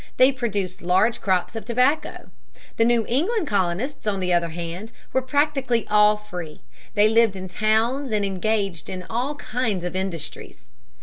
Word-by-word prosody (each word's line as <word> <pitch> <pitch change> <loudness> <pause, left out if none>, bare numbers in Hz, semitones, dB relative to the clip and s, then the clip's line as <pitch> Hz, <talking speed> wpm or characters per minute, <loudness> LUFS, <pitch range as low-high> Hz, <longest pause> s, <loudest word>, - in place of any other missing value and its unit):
They 255 +2 +6
produced 205 -8 -3
large 190 +7 +2
crops 185 +2 0
of 225 - -4
tobacco. 260 +6 0 0.5
The 225 - +4
New 235 -1 +3
England 345 - +1
colonists 205 +4 -1
on 200 -2 0
the 180 -1 0
other 170 -1 +2
hand 170 +6 -6 0.2
were 260 - +3
practically 265 -3 +1
all 210 0 +5
free. 180 -7 -8 0.3
They 205 0 +5
lived 225 -2 +3
in 185 0 -6
towns 220 +8 +1
and 210 -2 +1
engaged 195 -2 -1
in 185 -1 -6
all 250 +6 -1
kinds 225 -9 -2
of 180 - -4
industries. 185 -5 -5
215 Hz, 160 wpm, -23 LUFS, 185-250 Hz, 0.5 s, They